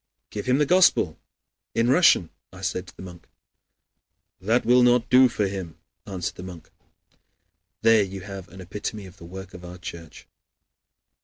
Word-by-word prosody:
"Give 105 +2 -6
him 130 +1 +3
the 150 - +3
Gospel 175 - +3 0.6
in 115 +1 +2
Russian," 135 - +4 0.2
I - - -12
said - - -3
to - - -15
the - - -9
monk. 85 -2 -12 1.1
"That 110 +6 +1
will 125 +2 +5
not 125 -1 +3
do 130 0 +7
for 105 -3 -1
him," 95 -4 -5 0.3
answered 95 -3 -4
the - - -8
monk. 90 -4 -11 1.1
There 115 -1 +6
you 95 -1 -4
have 95 -1 -9
an 95 - -12
epitome 100 +3 -6
of 90 - -14
the 85 - -12
work 95 +2 -10
of 90 - -11
our 90 +1 -9
Church. 85 -3 -10
95 Hz, 165 wpm, -24 LUFS, 90-115 Hz, 1.1 s, do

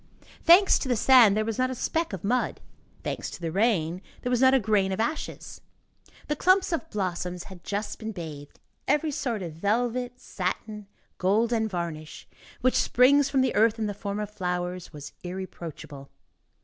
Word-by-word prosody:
Thanks 365 +3 +6
to - - -4
the 250 - +2
sand, 230 -3 +6
there 215 - +1
was 225 0 -3
not 255 0 +2
a 260 - -4
speck 325 +6 -1
of 190 -4 -6
mud; 245 +5 0 0.4
thanks - - -3
to - - -9
the 165 -2 -3
rain, 185 -4 +1 0.2
there 250 - -1
was 245 0 +2
not 260 0 +6
a - - +5
grain 205 -3 +1
of 190 - -3
ashes. 305 +8 -4 0.7
The 300 - 0
clumps 370 +4 +3
of 325 0 -3
blossoms 180 -3 -3
had 180 -2 -12
just 205 +1 -4
been 220 -1 -5
bathed; 155 -7 -9 0.3
every 300 +2 +2
sort 235 -7 -2
of 165 -3 -6
velvet, 245 +7 -1
satin, 210 +2 -4 0.3
gold 215 +6 +2
and 220 -1 +1
varnish, 165 -4 -5 0.3
which 255 +1 +3
springs 275 +3 +4
from 270 - +2
the 260 -1 +1
earth 220 +1 +3
in 220 - -1
the 205 - -2
form 200 0 -4
of 210 -1 -4
flowers, 180 -2 -3
was 145 -3 -9
irreproachable. 170 -6 -8
210 Hz, 180 wpm, -26 LUFS, 180-250 Hz, 0.7 s, Thanks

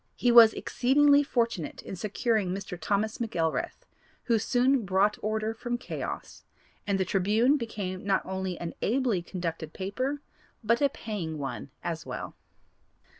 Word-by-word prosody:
He 245 - +2
was 230 -2 +9
exceedingly 285 +3 +4
fortunate 230 - -1
in - - -6
securing 215 +1 0
Mr. 195 0 -4
Thomas 205 +4 -1
McElrath, 220 - -2 0.4
who 230 -2 +2
soon 255 +3 +2
brought 195 +2 +2
order 215 +1 -1
from 240 +1 -3
chaos, 240 - -6 0.4
and 200 -1 +1
the 190 - +1
Tribune 215 +9 +3
became 205 -8 -4
not 195 -1 +1
only 190 -2 -3
an 170 -1 -5
ably 235 -5 +1
conducted 165 -3 -5
paper 255 +9 -3 0.4
but 235 +3 +2
a 280 - +4
paying 195 - -5
one 135 -1 -5
as 165 -2 -3
well. - - -6
210 Hz, 140 wpm, -28 LUFS, 185-240 Hz, 0.4 s, was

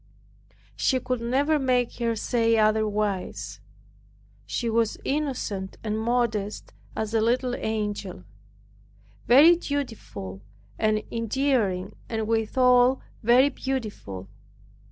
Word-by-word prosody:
She 260 - +1
could 255 -2 -3
never 280 +6 +1
make 250 -3 +1
her 230 -1 0
say 230 0 +1
otherwise. 215 -2 0 0.9
She 235 - -2
was 225 -1 +1
innocent 255 -10 -2
and 215 0 -2
modest 220 -3 -1 0.2
as 220 0 -3
a 225 - +3
little 245 +2 +1
angel; 210 - -3 1.0
very 290 +9 +8
dutiful 235 - -5 0.4
and 215 -1 +1
endearing, 225 -5 0
and 220 -2 -2
withal 250 +3 +3 0.2
very 245 +5 +5
beautiful. 215 - -5
230 Hz, 95 wpm, -26 LUFS, 215-255 Hz, 1.0 s, very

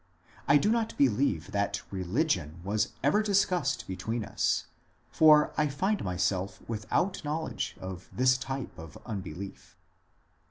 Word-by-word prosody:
I 145 - +7
do 205 +8 +2
not 230 -1 0
believe 120 - +2
that 100 0 -1
religion 95 - -1
was 105 +3 0
ever 150 +10 +4
discussed 190 -7 +1
between 105 +4 -3
us, - - 0 0.5
for 155 -1 +6
I 150 - +3
find 190 +9 -1
myself 95 +1 -1
without 115 - -1
knowledge 155 +2 -3
of 95 -1 -7
his 130 +1 +5
type 135 -4 -5
of 80 -3 -10
unbelief. 100 -3 -7
115 Hz, 125 wpm, -29 LUFS, 95-150 Hz, 0.5 s, I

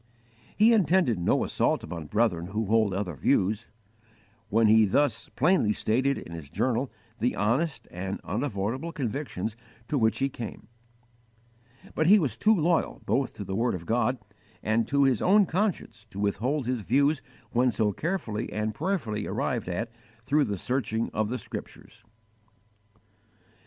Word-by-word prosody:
He 220 +3 +6
intended 175 - +3
no 85 - +2
assault - - 0
upon 85 -4 -6
brethren 105 -5 +1
who 105 +4 -2
hold 110 0 +3
other 95 -2 -2
views, 105 - +1 0.8
when 115 +1 +3
he 110 +1 +6
thus 115 +3 +1
plainly 155 - +3
stated 130 +7 +1
in - - -9
his 80 -4 -8
journal 125 - 0 0.3
the 120 +3 +1
honest 135 +10 0
and 95 +2 -4
unavoidable 115 - -2
convictions 125 - -3 0.3
to 145 - +1
which 110 -1 +2
he 135 - +1
came; 120 -5 -8 1.3
but 155 - +1
he 205 +4 +8
was 150 - 0
too 220 +1 +4
loyal 170 -1 0
both 135 -2 0
to 105 - -6
the 95 - -5
word 115 0 +1
of 85 -2 -7
God 120 +4 +1 0.5
and 110 +1 +1
to 140 0 +3
his 130 -5 +2
own 200 +2 +5
conscience 180 - -2
to 100 -2 -8
withhold 120 +8 0
his 125 -1 -1
views 140 +7 +2 0.3
when 125 +1 +3
so 105 -1 +1
carefully 120 - -3
and 110 0 -2
prayerfully 110 - -2
arrived - - -2
at 115 +6 -3 0.3
through 145 +4 +2
the 100 - -3
searching 115 0 -1
of 110 -1 0
the 125 - -2
Scriptures. 110 - -9
115 Hz, 150 wpm, -27 LUFS, 105-140 Hz, 1.3 s, he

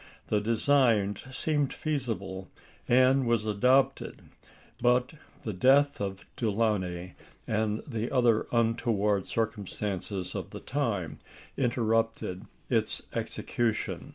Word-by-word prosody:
The 105 - +2
design 115 -2 +3
seemed 145 +1 0
feasible, 110 -11 -3 0.4
and 130 +1 +4
was 115 -2 +2
adopted; 125 +6 +2 0.6
but 125 +3 +3 0.3
the 110 - -3
death 135 +8 +4
of 95 -1 -4
Delaunay 100 -6 -1 0.3
and 110 0 0
the 115 -4 -3
other 120 -4 +3
untoward 115 -4 +1
circumstances 100 -3 -3
of - - -5
the - - -8
time 110 - -2 0.4
interrupted 115 -6 0 0.2
its - - 0
execution. 115 -3 -2
115 Hz, 100 wpm, -29 LUFS, 105-125 Hz, 0.6 s, and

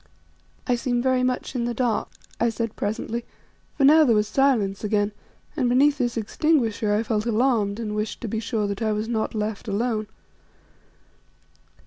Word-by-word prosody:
"I 250 - +1
seem 245 0 -1
very 260 0 +2
much 255 +1 -1
in 240 -3 -1
the 240 0 -2
dark," 235 -3 0 0.3
I 235 - +3
said 230 0 -3
presently; 220 +3 -3 0.5
for 280 - +1
now 310 +3 +7
there 240 -6 +4
was 210 0 +2
silence 225 -8 +1
again, 210 -1 +1 0.4
and 255 -6 +1
beneath 280 +4 +3
this 240 -2 -1
extinguisher 225 -3 +1
I 210 +2 +2
felt 220 0 -1
alarmed 225 -3 +1
and 215 -2 -3
wished 210 +1 -3
to 235 - -4
be 220 +1 -2
sure 220 -1 -1
that 200 +1 -4
I 220 -1 +1
was 210 +1 -2
not 225 -1 -2
left 210 0 -3
alone. 215 +1 -1
230 Hz, 170 wpm, -24 LUFS, 210-250 Hz, 0.5 s, now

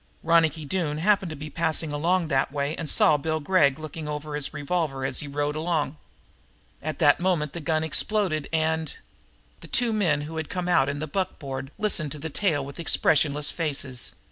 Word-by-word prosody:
Ronicky 160 -1 +3
Doone 155 -2 -1
happened 195 +2 +2
to 155 - -6
be 150 +1 -8
passing 160 -1 0
along 170 +3 +1
that 135 -2 +1
way 145 +2 -2
and 160 - -4
saw 150 - +5
Bill 155 +2 -1
Gregg 145 -4 +3
looking 155 0 -7
over 150 0 -5
his 145 -1 -1
revolver 150 -3 -2
as - - 0
he 145 - -4
rode 145 +1 -2
along. 155 -2 -1 0.9
At 155 +1 -4
that 145 -4 +4
moment 170 -5 0
the 170 - -4
gun 155 0 0
exploded 160 -1 +2
and 160 -1 0 0.6
The - - -12
two 235 -2 +2
men 170 -9 +2
who 160 +2 -6
had 160 -1 -4
come 180 -1 -3
out 140 -6 +3
in 140 - -3
the 150 - -3
buckboard 140 -6 -4
listened 170 -9 0
to - - -7
the 160 +2 -6
tale 155 -6 0
with 140 +4 -9
expressionless 150 -3 +2
faces. 140 -6 -3
155 Hz, 190 wpm, -25 LUFS, 145-165 Hz, 0.9 s, saw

